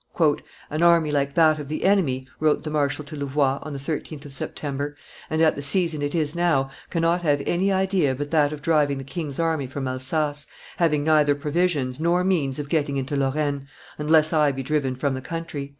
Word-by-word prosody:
"An 155 +2 -1
army 170 -3 +4
like 140 -1 0
that 155 -2 +4
of 145 - -6
the 155 +2 -4
enemy," 155 -10 +2
wrote 155 -1 +2
the 155 - -4
marshal 150 0 0
to 155 +2 -8
Louvois, 140 -1 0
on 155 - -7
the 140 - -4
13th 150 +1 -5
of 140 - -8
Septem 140 +1 -4
ber, 145 +1 -3 0.3
"and 160 +1 +1
at 160 - +4
the 140 - -5
season 160 +1 +1
it 145 +3 -2
is 155 -2 +1
now, 165 -6 +1 0.2
cannot 170 +1 +1
have 145 -4 +1
any 190 +3 +1
idea 190 -7 +1
but 145 +2 -5
that 150 -3 +3
of 150 -2 -7
driving 150 -3 +2
the 135 - -6
king's 145 0 -5
army 160 -5 0
from 135 +1 -4
Alsace, 145 +3 -1 0.3
having 150 -4 +2
neither 150 -2 +4
provisions 145 -3 0
nor 170 +2 +2
means 155 -8 +1
of 145 -1 -4
getting 145 -3 0
into 135 +2 -2
Lorraine, 140 0 -1 0.3
unless 155 +1 +3
I 150 -2 +4
be 135 0 -5
driven 135 -2 0
from 135 +2 -1
the 130 - -4
country." 150 -2 -5
150 Hz, 205 wpm, -24 LUFS, 140-160 Hz, 0.3 s, army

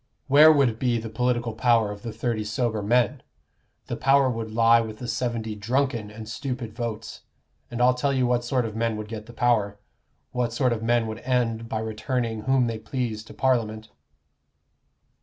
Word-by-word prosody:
Where 150 +3 +8
would 130 -7 +2
be 125 -2 +1
the 115 -1 -6
political 120 -1 0
power 115 -2 +2
of 105 0 -8
the 115 - -5
thirty 115 0 -2
sober 110 +1 -1
men? 120 +4 +1 0.6
The - - -4
power 135 -1 +3
would 115 -1 -4
lie 115 +1 +5
with 110 -1 -6
the 125 - -7
seventy 115 -1 -2
drunken 115 +1 -1
and 110 +1 -9
stupid 120 0 -5
votes; 115 -2 -5 0.5
and 120 - -5
I'll 125 +1 +5
tell 130 +3 0
you 130 -2 +1
what 120 0 +1
sort 125 0 0
of 110 -1 -5
men 115 -1 -1
would 105 0 -6
get 110 -1 -7
the - - -10
power 110 -5 +1 0.5
what 120 -2 -1
sort 125 -1 +2
of 110 - -4
men 120 0 +2
would 110 0 -5
end 115 -3 -1
by 110 - -2
returning 110 +1 -2
whom 130 -1 +3
they 115 -2 -3
pleased 110 -1 -4
to - - -12
Parliament." 110 -4 0
115 Hz, 185 wpm, -25 LUFS, 110-125 Hz, 0.6 s, Where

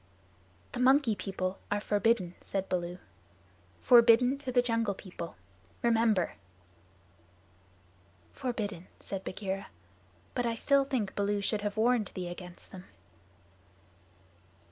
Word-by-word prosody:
"The 245 - -5
Monkey 260 -2 +4
People 185 0 -3
are 205 - +1
forbidden," 205 -3 +1
said 195 -1 -3
Baloo, 175 -1 -2 0.8
"forbidden 245 +2 +6
to 270 -3 -4
the 245 0 +4
Jungle 230 -4 0
People. 175 - -8 0.5
Remember." 225 -5 +3 2.0
"Forbidden," 205 -8 -4
said 195 -1 -5
Bagheera, 195 0 -4 0.7
"but 245 -1 0
I 230 - 0
still 275 +4 +3
think 240 -8 -1
Baloo 205 0 0
should 205 +1 -1
have 205 0 -3
warned 230 -1 +3
thee 180 -1 -4
against 175 0 -10
them." 185 -1 -10
210 Hz, 110 wpm, -31 LUFS, 190-240 Hz, 2.0 s, forbidden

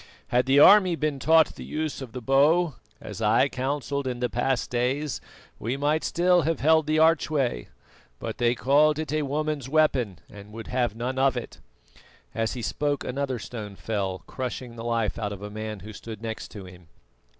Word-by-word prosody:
Had 125 +1 +2
the 135 +1 +4
army 185 +3 +7
been 150 -3 -2
taught 160 +2 +4
the - - -9
use 155 -2 -4
of 130 -3 -7
the 125 -1 -7
bow, 150 +6 +3 0.3
as - - -8
I 110 +5 +4
counselled 140 +1 -2
in 125 -1 -3
the 125 -2 -1
past 125 +1 -1
days, 130 +4 -1 0.4
we 120 +5 -2
might 150 +3 +1
still 175 +1 +3
have 165 -1 -1
held 160 0 +4
the 155 0 +2
archway; 155 - +2 0.5
but - - -6
they 120 0 +2
called 150 +4 +3
it 155 -2 -3
a 155 - +1
woman's 145 -1 -2
weapon, 135 - +2
and 105 0 -13
would 115 0 -7
have 125 -4 0
none 125 +3 -3
of 135 -1 +3
it." 120 - -7 0.7
As 115 0 -1
he 120 - -6
spoke 145 +3 -1
another 135 0 -2
stone 105 -3 -7
fell, 95 -3 -3
crushing 125 -2 -5
the 115 - -7
life 115 -2 -1
out 105 -2 -2
of 100 0 -9
a 105 - -6
man 110 -1 -6
who 105 +3 -9
stood 110 0 -8
next 110 -1 -5
to 100 -3 -9
him. 90 -2 -14
130 Hz, 190 wpm, -26 LUFS, 115-150 Hz, 0.7 s, army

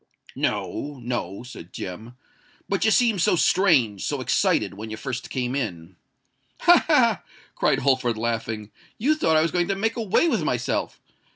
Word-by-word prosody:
"No—no," 120 -8 -3
said 110 -8 -11
Jem; 110 +7 -7 0.5
"but 195 -1 0
you 220 - +4
seemed 220 -4 +3
so 165 - +3
strange—so 145 - +2
excited—when 110 +3 0
you 110 - -6
first 125 +2 -5
came 125 -1 -2
in——" 90 -9 -4 0.7
"Ha! - - +6
ha!" - - +3 0.3
cried - - +2
Holford, 130 -4 +1
laughing: 110 -2 -3 0.3
"you 275 +8 +2
thought 160 - +2
I 155 - +4
was 165 - 0
going 175 -1 +1
to 195 - 0
make 220 +3 -1
away 230 - +2
with 235 - +1
myself! 125 -4 -2
125 Hz, 150 wpm, -24 LUFS, 110-180 Hz, 0.7 s, Ha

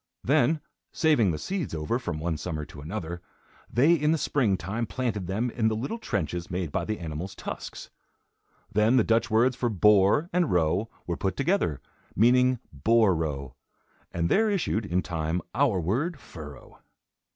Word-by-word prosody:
Then, 150 +3 +3 0.3
saving 150 - +3
the 80 - -1
seeds 185 - -3
over, 80 +10 -1
from 80 -10 -4
one 80 +1 -1
summer 75 -1 -4
to 70 - -11
another, 85 +1 -5 0.5
they 140 +9 +5
in 150 -2 +2
the 165 - +2
spring 120 -10 +1
time 110 +7 -3
planted 110 -7 -2
them 110 +6 -1
in 110 -2 0
the 110 - +1
little 135 - -3
trenches 85 - -3
made 90 -3 -3
by - - -1
the 110 0 -2
animal's 85 +3 -6
tusks. - - -7 0.8
Then 110 +4 +3
the 120 - +5
Dutch 115 +3 +2
words 120 +3 +3
for 125 -2 0
"boar" 105 - +4
and 175 -3 +2
"row" 90 +6 +1 0.2
were 85 -1 -3
put 95 -2 -2
together, 140 - 0 0.3
meaning 125 +3 +4 0.2
boar 110 - +3
row, 70 -6 -3 0.6
and 85 0 0
there 220 - +3
issued, 160 - 0
in 90 0 0
time, 80 0 -2
our 125 -6 +2
word 135 - -1
"furrow." 75 - -11
105 Hz, 165 wpm, -27 LUFS, 85-125 Hz, 0.8 s, they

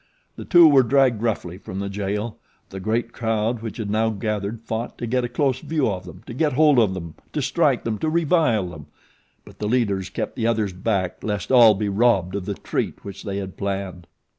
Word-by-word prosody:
The - - -8
two 175 -3 +7
were 140 -3 +6
dragged 130 -3 +3
roughly 95 -6 -2
from 95 - -8
the 100 - -3
jail. 105 +3 -3 0.3
The 95 - -6
great 115 +4 -1
crowd 110 0 -1
which 115 -2 -6
had 105 -3 -3
now 110 +1 +2
gathered 105 0 -3
fought 115 +1 -5
to - - -4
get 125 +2 0
a 120 - -2
close 130 +1 0
view 155 -1 -1
of 90 -2 -5
them, 90 +1 -12
to - - -8
get 150 +3 0
hold 150 -1 +5
of 100 -5 +2
them, 85 -3 -7 0.2
to - - -1
strike - - +1
them, 110 -2 -2
to 160 - 0
revile 155 - +2
them; 80 -5 -11 0.6
but - - -16
the 105 - -2
leaders 100 -6 0
kept - - -4
the 115 -2 0
others 110 -4 0
back 95 -1 -2
lest 105 0 -3
all 115 -4 +7
be 105 +2 -2
robbed 100 -3 +2
of 100 -2 -3
the 100 - -2
treat - - -4
which 100 -1 -8
they 100 -1 -4
had 95 -1 -6
planned. 95 -3 -4
110 Hz, 215 wpm, -23 LUFS, 100-120 Hz, 0.6 s, two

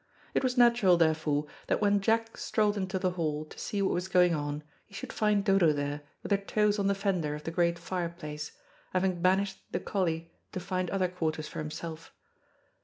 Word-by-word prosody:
It - - +2
was 255 0 0
natural, 235 -7 +6
therefore, 155 -3 +2 0.2
that - - +1
when 205 -1 +3
Jack 225 +2 +1
strolled 210 -1 +1
into 190 -1 -2
the 185 -1 +1
hall, 155 -3 -2
to - - -13
see 200 -1 -1
what 190 - +2
was 180 +1 -1
going 180 -2 +4
on, 145 -1 -2 0.2
he 200 - -15
should - - -6
find 210 -2 +2
Dodo 190 -5 +5
there 145 0 -2 0.2
with - - -6
her 200 - +4
toes 210 +1 +1
on 200 - +2
the 200 - +2
fender 185 -7 0
of 150 - -8
the 165 - -3
great 170 0 +2
fireplace, 170 -4 -4 0.4
having 185 -1 +1
banished 190 +2 +2
the - - -1
collie 165 -4 -2 0.2
to - - -2
find 185 0 -2
other 190 -2 +1
quarters 160 -3 -2
for - - -7
himself. 160 +1 -6
180 Hz, 195 wpm, -30 LUFS, 160-200 Hz, 0.4 s, natural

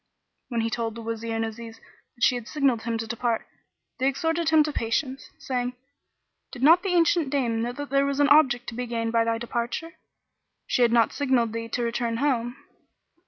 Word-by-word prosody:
When 235 -2 -1
he 225 0 -1
told 230 -1 -2
the 230 - -8
Wazir 230 0 -4
and 225 0 0
Aziz 225 0 -8 0.4
that 240 - -6
she - - +5
had 240 -2 -5
signed 275 -6 +1
him 230 0 -2
to 225 - -4
depart, 235 0 -2 0.5
they 260 - +2
exhorted 325 +4 0
him 315 -1 +5
to 300 0 -3
patience, 260 +3 -2
saying, 250 -1 -3 0.8
"Did 250 - -7
not 330 +5 +7
the 390 - -2
ancient 335 -3 +3
dame 240 -5 0
know 240 +1 -1
that 290 +1 -7
there 275 0 +3
was 280 0 -2
an 285 -1 +4
object 255 -5 +5
to - - -9
be 245 +1 -4
gained 230 -1 -2
by 230 0 +3
thy 230 0 0
departure, 240 +8 -4 0.7
she - - 0
had 235 -1 +5
not 230 -2 +3
signalled 255 -6 +1
thee 230 0 -4
to 240 +1 -2
return 235 0 -1
home." 245 -2 0
240 Hz, 205 wpm, -25 LUFS, 230-275 Hz, 0.8 s, not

